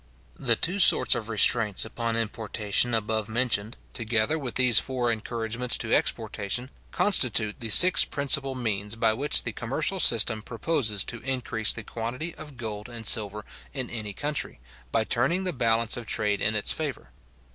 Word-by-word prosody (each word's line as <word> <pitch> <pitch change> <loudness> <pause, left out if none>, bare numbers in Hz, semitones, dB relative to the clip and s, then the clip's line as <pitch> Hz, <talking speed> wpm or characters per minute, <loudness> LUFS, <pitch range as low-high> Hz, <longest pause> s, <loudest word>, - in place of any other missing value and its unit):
The 120 -5 +2
two 180 - -3
sorts 130 -9 +3
of 110 0 -5
restraints 110 -1 +1
upon 115 0 -3
importation 110 +1 -2
above 110 -1 -2
mentioned, 115 -2 -2 0.2
together 115 +4 -1
with 125 -5 -6
these 125 -3 +6
four 125 -2 -2
encouragements 115 +2 -2
to - - -2
exportation, 120 +6 -1 0.2
constitute 115 - +2
the 115 - -4
six 180 - +9
principal 140 -1 -2
means 105 -3 -3
by 110 -1 +1
which 140 +6 +2
the 115 - -3
commercial 140 - -3
system 110 -6 +4
proposes 115 -3 -1
to 120 - -6
increase 120 -3 -1
the 110 - -5
quantity 125 +10 -5
of 150 -4 -12
gold 110 -1 -7
and 115 -2 -8
silver 105 -1 +2 0.3
in 130 -3 -2
any 105 -3 -5
country, 145 - -4 0.3
by 110 - +1
turning 135 +12 0
the 180 -2 -1
balance 115 -3 0
of 120 -2 -8
trade 105 -1 -1
in 110 - 0
its 105 - +2
favour. 140 - -5
115 Hz, 160 wpm, -25 LUFS, 110-130 Hz, 0.3 s, six